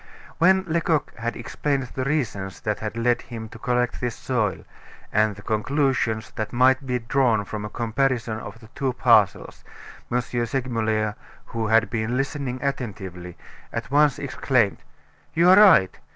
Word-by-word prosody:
When 190 +2 +5
Lecoq 165 -3 0
had 115 +1 -3
explained 135 +3 -2
the 130 - -2
reasons 115 -10 -2
that 105 -1 -2
had 110 +1 -5
led 120 +1 +1
him 115 -2 -8
to 115 - -12
collect 125 +1 -1
this 120 -2 -2
soil, 110 -7 -2 0.5
and 105 0 +2
the 100 - -13
conclusions 115 -1 0
that 110 -2 -3
might 130 +2 +3
be 125 -1 0
drawn 115 -3 +1
from 105 0 -5
a - - -5
comparison 115 -1 -1
of 115 - -9
the 110 - -13
two 130 0 -2
parcels, 115 -6 +2 0.5
M. 120 - +2
Segmuller, 115 -3 -1 0.3
who 115 -1 -3
had 115 +2 +3
been 115 +1 -1
listening 135 -2 -2
attentively, 95 -10 -5 0.3
at - - -5
once 145 -1 +4
exclaimed: 130 -6 0 0.5
"You 170 +2 +6
are - - +9
right. 185 - +6
120 Hz, 150 wpm, -24 LUFS, 110-135 Hz, 0.5 s, are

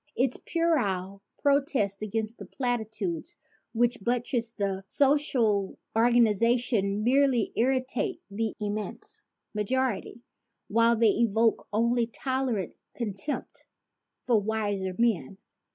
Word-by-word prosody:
Its 255 0 +2
puerile 200 - 0 0.2
protests 275 -9 +2
against 215 +1 -3
the - - -7
platitudes 220 - -3 0.3
which 240 -1 +1
buttress 240 0 -1
the 195 -3 -2
social 250 -8 +2 0.2
organization 230 -2 +3
merely 260 -1 +3
irritate 255 0 0
the 220 +2 -2
immense 210 0 -4 0.3
majority, 235 +1 -1 0.5
while 230 +2 +4
they 225 -1 +4
evoke 225 0 +1
only 235 +2 +2
tolerant 260 -5 -2 0.2
contempt 230 +4 -3 0.6
from 225 -5 +3
wiser 205 -3 -1
men. 200 - 0
230 Hz, 95 wpm, -28 LUFS, 205-250 Hz, 0.6 s, while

